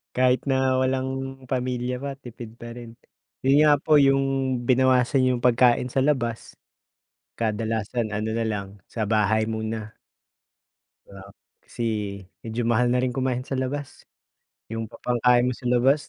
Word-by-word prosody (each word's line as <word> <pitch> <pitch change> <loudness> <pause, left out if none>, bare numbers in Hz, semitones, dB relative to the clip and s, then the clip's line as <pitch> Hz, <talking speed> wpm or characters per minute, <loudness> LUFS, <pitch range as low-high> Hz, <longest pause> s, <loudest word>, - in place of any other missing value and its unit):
Kahit 130 +2 +2
na 130 -1 +2
walang 130 0 -2
pamilya 125 -1 -2
pa 140 0 -5
tipid 120 -4 -11
pa 120 0 -9
rin. 120 -1 -10 0.5
Yun 135 +1 +4
nga 150 -1 +6
po 150 0 +4
yung 135 0 +4 0.4
binawasan 130 +1 +3
yung 125 -1 -1
pagkain 125 0 +3
sa 135 - +1
labas, 120 -6 -1 0.8
kadalasan 110 0 -2
ano 110 +2 -2
na 115 0 -1
lang, 100 -3 -2 0.2
sa 110 - -3
bahay 110 0 +2
muna. 110 -1 -4 1.1
Di - - -27
ba, 95 -1 -11 0.4
kasi 120 - -7 0.6
medyo 115 +1 -4
mahal 120 +1 +2
na 125 0 +2
rin 125 -1 -1
kumain 130 -1 -1
sa - - -5
labas. 140 +2 -5 0.6
Yung 115 0 -3
pa - - -13
pangkain 125 +1 +3
mo - - -3
sa 125 - -9
labas 135 +4 +2
125 Hz, 150 wpm, -24 LUFS, 115-130 Hz, 1.1 s, nga